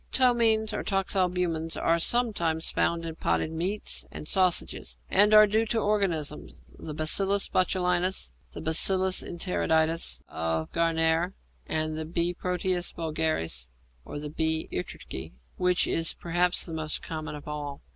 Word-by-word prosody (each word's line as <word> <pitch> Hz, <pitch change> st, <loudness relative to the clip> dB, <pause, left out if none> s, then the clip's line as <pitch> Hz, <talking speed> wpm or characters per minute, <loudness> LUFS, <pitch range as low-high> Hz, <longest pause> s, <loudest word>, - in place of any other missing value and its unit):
Ptomaines 230 Hz, -4 st, +3 dB
or -, -, -3 dB
toxalbumins 180 Hz, -4 st, 0 dB
are 170 Hz, 0 st, +1 dB
sometimes 170 Hz, -7 st, +1 dB
found 170 Hz, 0 st, 0 dB
in 165 Hz, -, -5 dB
potted 85 Hz, -, 0 dB
meats 185 Hz, +6 st, -1 dB
and 150 Hz, -, -8 dB
sausages, 175 Hz, -, +1 dB
and 210 Hz, +1 st, +6 dB
are 215 Hz, 0 st, +8 dB
due 220 Hz, +2 st, 0 dB
to 230 Hz, -, -1 dB
organisms 185 Hz, -9 st, -1 dB, 0.2 s
the 155 Hz, -, -8 dB
Bacillus 195 Hz, +6 st, +2 dB
botulinus, 180 Hz, -, +1 dB, 0.2 s
the -, -, -7 dB
B. 160 Hz, -, 0 dB
enteritidis 165 Hz, -, +1 dB
of 80 Hz, 0 st, -3 dB
Gärtner, 165 Hz, +1 st, +1 dB, 0.3 s
the 155 Hz, 0 st, -2 dB
B. 170 Hz, +2 st, 0 dB
proteus 180 Hz, 0 st, -1 dB
vulgaris, 155 Hz, -, -2 dB, 0.4 s
or -, -, -8 dB
the 150 Hz, 0 st, -6 dB
B. 160 Hz, 0 st, +1 dB
ærtrycke 80 Hz, -7 st, -6 dB, 0.2 s
(which 180 Hz, -1 st, +2 dB
is 165 Hz, -1 st, +1 dB
perhaps 175 Hz, +1 st, +1 dB
the 165 Hz, -, -8 dB
most 155 Hz, -1 st, -3 dB
common 155 Hz, -1 st, -6 dB
of 145 Hz, -, -11 dB
all). 145 Hz, -2 st, -6 dB
165 Hz, 135 wpm, -27 LUFS, 155-185 Hz, 0.4 s, are